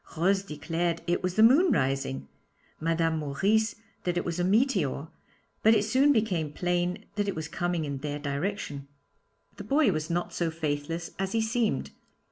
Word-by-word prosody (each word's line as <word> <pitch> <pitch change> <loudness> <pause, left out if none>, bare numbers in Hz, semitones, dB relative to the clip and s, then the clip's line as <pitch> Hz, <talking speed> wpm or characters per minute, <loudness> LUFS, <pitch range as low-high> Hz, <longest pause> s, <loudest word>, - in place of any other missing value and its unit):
Rose 190 +4 +3
declared 165 0 -2
it 175 +1 0
was 180 0 -2
the 220 - +5
moon 290 +10 +6
rising, 130 - 0 0.5
Mme. 165 0 +1
Maurice 200 +10 +1 0.3
that 175 -1 -1
it 175 - -1
was 170 0 -2
a - - +2
meteor, 190 - +1 0.5
but 220 +1 +6
it 210 -1 +2
soon 265 +6 +4
became 190 - +1
plain 175 +4 -1
that 205 0 +1
it 200 - -1
was 160 -1 -4
coming 175 0 -1
in 140 -2 -4
their 145 0 -3
direction. 145 0 -3 0.7
The - - -6
boy 280 -5 +3
was 155 -1 -3
not 175 +1 -1
so 170 -1 0
faithless 160 +1 -3
as 195 0 -2
he 225 - +2
seemed. 220 0 0
175 Hz, 170 wpm, -28 LUFS, 155-210 Hz, 0.7 s, moon